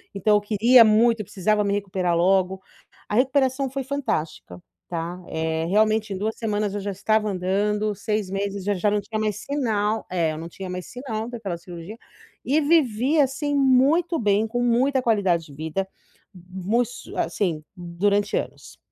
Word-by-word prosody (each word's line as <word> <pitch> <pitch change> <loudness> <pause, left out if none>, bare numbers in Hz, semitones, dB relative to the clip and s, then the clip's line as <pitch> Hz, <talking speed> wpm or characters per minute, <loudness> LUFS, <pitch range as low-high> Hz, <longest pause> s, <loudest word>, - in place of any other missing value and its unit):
Então, 210 +2 +3
eu - - -1
queria 230 +4 +6
muito, 225 +1 +4
eu 215 - -4
precisava 210 +3 0
me 200 0 0
recuperar 185 -3 -1
logo. 190 +1 +2 0.5
A 210 - -1
recuperação 265 +1 +2
foi 270 +1 -4
fantástica, 165 - -3 0.3
tá, 175 +1 -5
eh, 160 0 -2
realmente, 215 +2 +2
em 190 - -4
2 215 +3 -2
semanas 210 -2 -1
eu 205 - -2
já 200 +1 -3
estava 210 +2 0
andando, 205 +3 0
6 210 -1 -2
meses 200 0 -3
já 205 +2 0
já 200 +2 +1
não 205 0 0
tinha 215 +1 -4
mais 215 -1 -1
sinal 220 -6 -1
é, 170 -3 0
eu 155 - -6
não 165 - -6
tinha 190 +1 -8
mais 180 0 -5
sinal 230 -4 -5
daquela 205 -8 -5
cirurgia. 175 +4 -10 0.5
E, 295 +4 +2
vivi 285 -2 +2
assim 290 +1 +1
muito 280 +6 +3
bem 210 0 +2
com 245 +2 -2
muita 255 +3 +2
qualidade 195 -8 +1
de 145 - -14
vida 160 +6 -3 0.5
mu 185 +5 -2
s 245 +1 -6
assim, 165 -6 -1
durante 185 +4 0
anos. - - -6
210 Hz, 170 wpm, -24 LUFS, 185-235 Hz, 0.5 s, queria